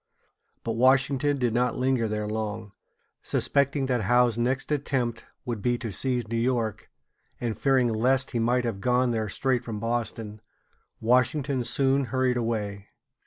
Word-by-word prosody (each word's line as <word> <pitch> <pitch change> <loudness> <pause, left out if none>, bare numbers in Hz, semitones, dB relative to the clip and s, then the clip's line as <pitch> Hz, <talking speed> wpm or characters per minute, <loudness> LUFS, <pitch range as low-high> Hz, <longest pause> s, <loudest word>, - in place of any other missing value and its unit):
But 115 - -2
Washington 135 +4 +3
did 120 -4 0
not 125 +1 +1
linger 125 -3 +1
there 105 0 -2
long. 110 0 -4 0.5
Suspecting 140 0 +1
that 125 -3 0
Howe's 120 +2 +3
next 130 +5 -1
attempt 130 -5 -1 0.2
would 120 -5 -3
be 120 +3 +1
to 115 -2 -5
seize 125 +3 -1
New 115 +1 -1
York, 115 -3 -1 0.5
and 115 -3 -2
fearing 130 +2 +2
lest 130 +4 +1
he 120 - -1
might 120 +2 +1
have 105 -5 -3
gone 125 +2 +2
there 110 -2 -1
straight 125 +4 0
from 110 -3 -5
Boston, 115 -2 -3 0.6
Washington 130 +3 +2
soon 135 +3 +1
hurried 130 0 +1
away. 105 -4 -3
120 Hz, 150 wpm, -26 LUFS, 115-130 Hz, 0.6 s, Washington